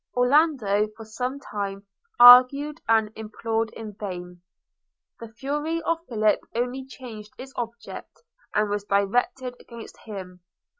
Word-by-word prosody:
Orlando 250 -6 +3
for 225 - -9
some 250 +5 -4
time 200 -5 -5 0.3
argued 255 +5 +8
and 220 -2 +3
implored 225 +1 -3
in 220 -2 -8
vain. 180 -3 -7 0.8
The 230 - -8
fury 295 +8 -3
of 335 0 0
Philip 215 -3 +2 0.2
only 250 +2 -2
changed 225 -5 -10
its 265 +1 -10
object, 235 - -7 0.3
and 210 0 +2
was 205 0 -1
directed 245 +6 0
against 235 -2 -12
him. 190 -4 -9
230 Hz, 120 wpm, -25 LUFS, 210-260 Hz, 0.8 s, argued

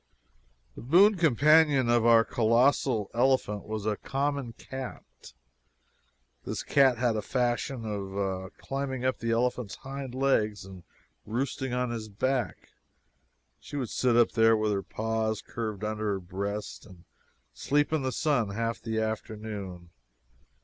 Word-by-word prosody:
The - - -10
boon 185 - +5
companion 150 -3 +4
of 120 0 +4
the 115 0 +6
colossal 115 -1 +2
elephant 120 -4 +1
was 110 -1 -4
a 105 -1 0
common 140 -2 -2
cat! 130 +3 -7 1.4
This - - -4
cat 135 -3 +4
had 120 -1 +1
a 105 - -1
fashion 120 +1 -1
of 95 -2 -3
climbing 135 -2 -4
up 130 - 0
the 115 - -3
elephant's 120 -2 0
hind 135 -1 -7
legs 110 -7 +1
and 95 -2 -11 0.4
roosting 130 +3 -3
on 125 -1 -1
his 110 -2 -5
back. 115 -3 -2 0.9
She - - -10
would 130 -6 -3
sit 125 -2 +2
up 120 - +4
there, 115 -1 +4
with 110 0 0
her 100 -1 0
paws 110 +1 -2
curved 110 -4 -5
under 105 -1 -1
her 95 - -2
breast, 100 +3 -5
and 90 -4 -15 0.5
sleep 145 +2 0
in 155 - +1
the 130 -1 -1
sun 135 -7 +1
half 115 +1 -2
the 110 -1 -2
afternoon. 105 -5 -5
115 Hz, 140 wpm, -28 LUFS, 105-130 Hz, 1.4 s, the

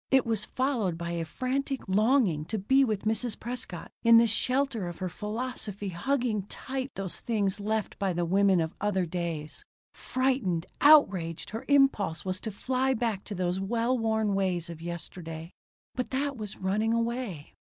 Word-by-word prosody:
It 265 -1 +4
was 220 -2 0
followed 240 -10 0
by 170 0 -4
a 170 -1 -2
frantic 265 - -2
longing 210 - +3
to 220 - -3
be 265 +8 +4
with 215 -6 -1
Mrs. 225 +1 0
Prescott 240 -7 -5
in 230 0 +8
the 230 - +7
shelter 245 -2 +1
of 175 - -6
her 185 - -3
philosophy, 210 0 -4
hugging 235 +4 0
tight 265 +3 -4
those 195 -2 -3
things 205 -4 0
left 215 +1 -2
by 195 -2 +1
the 175 0 -1
women 190 0 +4
of 160 0 -2
other 190 -3 +1
days. 165 -3 -4 0.3
Frightened, 255 -10 0 0.2
outraged, 195 - +5
her 225 +2 -5
impulse 270 - +3
was 185 0 -1
to 220 - -4
fly 260 +5 0
back 220 -4 -1
to 205 - -5
those 180 0 -1
well 230 +5 0
worn 220 -3 +1
ways 185 -3 0
of 165 -1 -9
yesterday. 170 -1 -7 0.4
But 250 - -3
that 280 +1 -1
was 210 -4 -6
running 210 +4 0
away. 230 - -3
210 Hz, 165 wpm, -29 LUFS, 180-250 Hz, 0.4 s, in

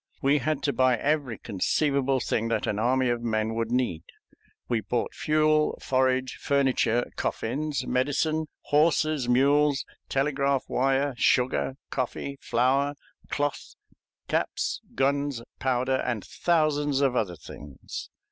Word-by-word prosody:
We 145 0 +3
had 140 +2 -1
to 140 - +1
buy 130 -2 +3
every 140 -4 0
conceivable 135 +6 0
thing 115 -2 -1
that 115 - 0
an 105 - -1
army 130 +2 +2
of 120 -1 0
men 110 -1 -1
could 115 0 -1
need. 120 -10 0 0.7
We 120 -2 0
bought 120 +2 -2
fuel, 155 0 +2
forage, 130 -1 +1
furniture, 130 -4 +2
coffins, 140 +3 -2
medicine, 145 +5 0
horses, 155 -3 +2
mules, 140 +2 +3 0.2
telegraph 140 -1 +1
wire, 135 +2 +1
sugar, 125 +2 +2 0.2
coffee, 135 +2 -3
flour, 135 +4 +1 0.3
cloth, 145 0 -2 0.5
caps, - - -1
guns, 140 -2 0 0.2
powder, 130 0 +1
and 120 -5 -2
thousands 150 -4 +1
of 135 -3 +2
other 95 -7 0
things. 70 -2 -9
135 Hz, 120 wpm, -27 LUFS, 125-145 Hz, 0.7 s, We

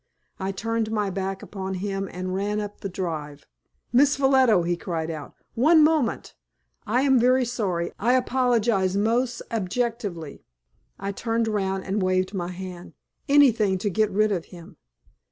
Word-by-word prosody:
I 190 0 -2
turned 225 +3 -2
my 210 -3 -1
back 195 0 -4
upon 190 -1 -5
him 195 0 -3
and 185 0 -4
ran 205 +2 -1
up 205 -1 -6
the 195 - -4
drive. 155 -6 -5 0.5
"Miss 280 +3 +5
Ffolliot," 265 -9 +4
he 175 0 +1
cried 165 -2 -4
out, 155 -3 -8 0.2
"one 305 +7 +5
moment; 305 -5 +1 0.5
I 245 +5 +2
am 265 -3 +4
very 255 +2 +3
sorry. 190 -8 -2
I 235 +5 +2
apologize 240 -7 +2
most 235 +3 0
abjectly." 210 - -3 0.5
I 195 0 -4
turned 230 +2 -1
round 195 -3 -1
and 195 +2 -2
waved 185 +1 +1
my 175 -3 -3
hand. 180 -1 -8 0.3
Anything 230 -9 +4
to 200 +2 -2
get 215 +3 +2
rid 210 +2 +2
of 175 -4 -2
him. 170 -2 -13
205 Hz, 155 wpm, -25 LUFS, 185-235 Hz, 0.5 s, Miss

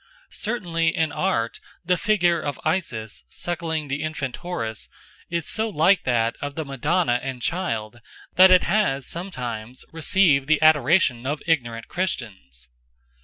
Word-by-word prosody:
Certainly 170 -8 -1
in 160 -2 +1
art 145 -11 -1 0.3
the 180 +1 +3
figure 175 -4 +2
of 145 -3 -4
Isis 120 - -2
suckling 160 - -3
the 140 +2 -3
infant 150 -5 -4
Horus 165 - -5 0.4
is 170 -1 -2
so 220 0 0
like 185 +1 +3
that 115 -2 +1
of 145 0 -4
the 160 - -3
Madonna 140 0 +1
and 135 -2 -5
child 120 -9 -3 0.3
that 185 +1 +8
it 185 -1 +6
has 170 - +1
sometimes 125 - -6
received 160 -4 +3
the 155 0 +3
adoration 150 -4 +3
of 145 +1 -3
ignorant 120 -8 -1
Christians. 100 - -5
155 Hz, 135 wpm, -23 LUFS, 125-175 Hz, 0.4 s, that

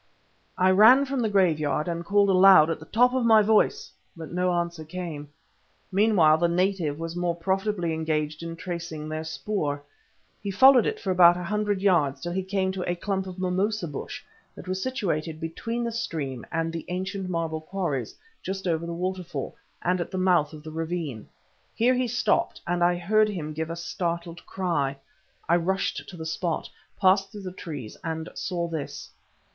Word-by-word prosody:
I 185 +1 +4
ran 225 +8 +7
from 275 -1 -2
the 225 -3 +1
graveyard 155 -7 +1
and 170 0 -3
called 200 +2 +3
aloud 185 -4 +7
at - - -3
the 160 - -12
top 250 +3 +3
of 260 -1 +1
my 220 -2 +6
voice, 220 - +2 0.3
but 160 -2 -8
no 180 +1 +1
answer 170 -2 -2
came. 160 -3 -6 0.6
Meanwhile 185 -6 +4
the 170 - +3
native 175 -4 0
was 165 +1 -5
more 175 -1 -1
profitably 190 0 -1
engaged 155 -1 -2
in 165 0 -5
tracing 170 -3 -6
their 155 0 -4
spoor. 155 -3 -3 0.6
He 200 - -4
followed 255 +4 +6
it - - -2
for 190 - -2
about 175 -1 +6
a 180 - -5
hundred 205 +1 -1
yards 150 -8 +3
till 175 - -4
he 190 +2 -1
came 190 0 -1
to 185 -2 -4
a - - -1
clump 190 +1 -2
of 185 0 -8
mimosa 185 +2 -1
bush 145 - -7 0.3
that - - -11
was 185 +1 -2
situated 170 - -2
between 230 +9 -4
the 235 - -2
stream 145 - -4
and 165 0 -1
the 165 - -4
ancient 190 +1 -4
marble 165 -2 -2
quarries 155 - -3 0.3
just 190 0 -5
over 170 0 0
the 170 - -4
waterfall, 180 -5 -4 0.3
and 180 0 +1
at - - -4
the 185 - -4
mouth 180 -5 +3
of 155 -1 -11
the 155 - -8
ravine. 160 -7 -4 0.5
Here 245 +3 +3
he 255 0 0
stopped, 235 -2 0
and 175 0 0
I 175 0 +3
heard 215 +5 +3
him 160 -7 -4
give 160 +1 -3
a 165 - -3
startled 170 0 -4
cry. 155 -8 -1 0.5
I 170 - +4
rushed 190 +3 -2
to 180 - -10
the 160 - -6
spot, 165 0 -2 0.3
passed 195 0 +3
through 205 -2 -9
the 185 - -5
trees, 145 - -7
and 160 0 -4
saw 175 -3 -3
this. 160 -4 -6
175 Hz, 185 wpm, -26 LUFS, 160-195 Hz, 0.6 s, ran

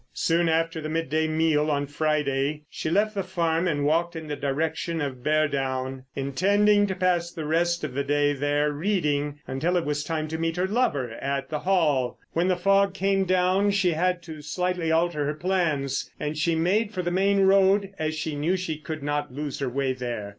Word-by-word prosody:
Soon 170 0 +2
after 165 0 0
the 155 - -4
midday 160 -1 0
meal 155 -1 +2
on 145 -1 0
Friday 150 -1 -1
she - - -3
left 210 +5 +2
the 200 - -1
farm 170 -2 0
and 145 -4 0
walked 170 +3 +1
in 160 -1 -6
the 145 - -3
direction 160 +4 -2
of 135 -4 -4
Beardown, 135 -4 0
intending 205 +9 +3
to 190 - -2
pass 180 -2 +1
the 160 -3 -6
rest 170 +2 +1
of 145 -4 -3
the 140 +2 -1
day 145 0 +2
there 145 +1 0
reading, 150 -4 -1
until 160 +7 0
it 170 - -1
was 145 0 -1
time 155 -1 -2
to 160 +1 -4
meet 165 0 -1
her 180 - +1
lover 190 - 0
at 140 0 -2
the 150 - -2
Hall. 150 -10 +1 0.2
When 170 +2 +1
the 185 -1 +2
fog 195 +1 +3
came 195 0 +1
down, 185 +2 +2
she 195 -3 +2
had 180 +2 0
to 160 -3 -9
slightly 180 +2 -1
alter 165 -2 +1
her 150 - -2
plans, 155 -6 -1
and 150 +1 -3
she 165 +2 +1
made 200 +7 +1
for 185 -4 -3
the 175 - -1
main 195 +2 +2
road 195 +1 +4
as 155 0 -1
she 155 -1 -3
knew 165 +6 0
she 165 -4 -4
could 155 0 -6
not 145 0 -2
lose 145 +1 -5
her 135 -2 -1
way 135 +1 -1
there. 120 -5 -5
160 Hz, 200 wpm, -25 LUFS, 145-180 Hz, 0.2 s, road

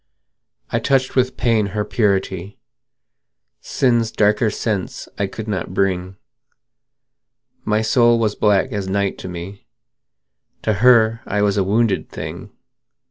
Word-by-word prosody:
I - - +1
touched 130 -1 +1
with 130 -1 +1
pain 110 -4 +2
her 105 - 0
purity; 100 -3 -1 1.0
Sin's 120 -4 +1
darker 105 +2 +2
sense 105 -2 -3
I 100 - +1
could 110 +3 -8
not 95 -3 -4
bring: 95 -1 -1 1.5
My 105 +1 +1
soul 120 +1 +4
was 110 -2 0
black 105 +4 +2
as 100 -3 -3
night 100 0 -1
to - - -7
me: 90 +3 -8 1.0
To 110 - +1
her 115 -2 +5
I 105 0 0
was 100 -1 +2
a 100 - +2
wounded 105 0 0
thing. 85 +7 -7
105 Hz, 130 wpm, -20 LUFS, 95-115 Hz, 1.5 s, her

